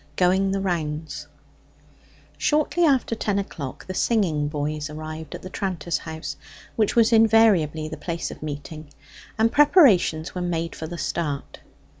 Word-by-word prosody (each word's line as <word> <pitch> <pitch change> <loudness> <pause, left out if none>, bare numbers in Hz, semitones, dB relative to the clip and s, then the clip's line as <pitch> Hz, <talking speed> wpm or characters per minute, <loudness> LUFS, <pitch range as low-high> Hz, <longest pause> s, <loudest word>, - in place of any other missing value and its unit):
GOING 190 +2 +3
THE 195 0 -1
ROUNDS 160 -4 -3 1.1
Shortly 305 +3 +2
after 270 -6 +2
ten 210 -3 -1
o'clock 155 -9 -5
the 185 - -5
singing 180 -9 +1
boys 150 0 -3
arrived 155 0 -7
at - - -10
the 185 - -7
tranter's 170 -5 -2
house, 160 -3 -6 0.4
which 215 -2 +1
was 230 0 +4
invariably 215 -9 +4
the 155 0 -7
place 170 +2 -4
of - - -11
meeting, 150 0 -7 0.5
and 225 +1 +3
preparations 240 - +4
were 180 - -4
made 170 -1 -2
for 160 - -6
the 175 +1 -7
start. 150 -5 -3
170 Hz, 145 wpm, -24 LUFS, 155-210 Hz, 1.1 s, was